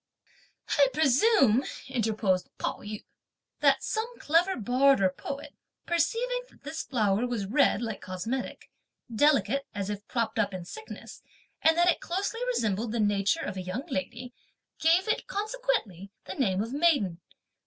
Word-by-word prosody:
"I 280 - +7
presume," 275 - +4 0.2
interposed 215 -7 0
Pao - - -3
yü, 210 0 -7 0.6
"that - - +3
some 460 +2 -3
clever 345 +5 +2
bard 255 +4 +3
or 190 -1 +4
poet, 280 +9 -7 0.3
(perceiving) 465 +10 0
that - - -24
this 300 +3 -4
flower 220 -2 +1
was 235 -5 -2
red 240 0 +2
like 225 -3 -4
cosmetic, 205 +8 -5 0.4
delicate 275 +1 +3
as 200 0 -2
if 205 +1 -7
propped 230 -2 -1
up 205 -3 +1
in 180 -2 -6
sickness, 440 - -10 0.4
and 320 +1 +4
that 345 +1 +4
it 355 - +3
closely 400 +6 -2
resembled 220 - 0
the 235 - -1
nature 205 -2 +2
of 190 - -5
a - - -3
young 185 +10 -4
lady, 250 -2 -4 0.5
gave 340 +5 +3
it, 435 - -1
consequently, 430 - -2 0.2
the - - -5
name 200 -7 +1
of 230 +3 -6
maiden! 280 - +2
250 Hz, 150 wpm, -28 LUFS, 205-330 Hz, 0.6 s, I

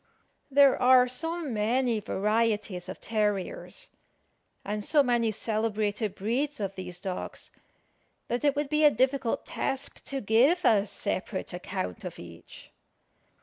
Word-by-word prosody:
There 280 -1 +5
are 250 0 +6
so 325 +7 -3
many 235 0 +1
varieties 210 -2 -1
of - - -7
terriers, 210 - -2 0.8
and 210 +1 -3
so 290 +6 +4
many 240 -3 +1
celebrated 215 -1 -1
breeds 265 +8 -1
of 195 -2 -3
these 180 -2 -6
dogs, 185 -1 -5 0.8
that 240 +3 -2
it 285 -1 +3
would 290 -1 -1
be 305 +1 +2
a 300 - +9
difficult 260 -1 0
task 270 0 -3
to 275 - -3
give 260 - +3
a 210 -2 +4
separate 190 -1 -3
account 190 +3 -5
of 180 -3 -6
each. 85 -1 -12
225 Hz, 130 wpm, -28 LUFS, 205-270 Hz, 0.8 s, a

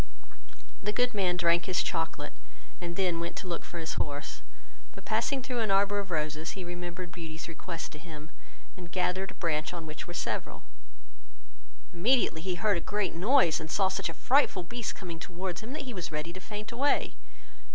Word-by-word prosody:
The 210 - +1
good 245 +2 +2
man 185 -4 +2
drank 170 -1 +4
his 185 -1 +3
chocolate, 160 -3 -1 0.5
and 170 -1 -3
then 180 -3 +2
went 170 +1 -3
to 185 - -5
look 170 -2 -2
for 175 - -7
his 160 -1 -1
horse; 145 +1 -3 0.5
but - - -11
passing 275 -2 +1
through 250 -2 -1
an 220 -2 +2
arbour 200 +1 +4
of 200 -1 -3
roses, 155 +1 -1
he 190 - -3
remembered 175 0 -5
Beauty's 165 -2 -6
request 170 0 -5
to 150 - -8
him, 155 -1 -9 0.4
and 175 -2 -9
gathered 185 +1 +1
a - - -6
branch 155 0 0
on 165 -2 -5
which 155 -1 -6
were 175 - -6
several; - - -2 1.3
immediately 200 -2 +4
he 180 +1 0
heard 205 0 +3
a - - -1
great 205 +3 0
noise, 185 - +5
and 160 - -5
saw 190 +2 +4
such - - 0
a 165 - -6
frightful 255 - +4
beast 235 +6 -3
coming 170 -4 -6
towards 180 0 -3
him, 225 +3 -6
that 300 - -3
he 255 -3 -5
was 180 -5 -4
ready 155 +2 -2
to 185 - -6
faint 210 +3 -6
away. 275 +4 +2
175 Hz, 195 wpm, -31 LUFS, 165-200 Hz, 1.3 s, noise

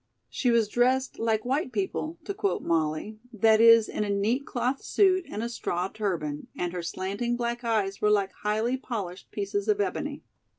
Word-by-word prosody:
She 250 - 0
was 230 -2 +3
dressed 255 +4 +1
"like 220 -1 0
white 265 +1 0
people," 230 - -2
to 400 - -4
quote 400 0 -1
Molly, 160 +6 -1
that 220 0 +4
is, 230 -1 +7
in - - -2
a 205 - -3
neat 215 +7 0
cloth 250 +2 -1
suit 375 -3 +2
and 215 - -4
a - - -1
straw 185 -6 -2
turban, 170 -9 -3
and 175 0 -2
her 180 - -3
slanting 200 +8 -2
black 240 0 -2
eyes 210 -4 0
were 210 - +3
like 200 -2 +2
highly 220 +4 0
polished 200 -8 -6
pieces 405 0 -3
of 420 -1 +2
ebony. 410 - -2
225 Hz, 180 wpm, -27 LUFS, 200-250 Hz, -, is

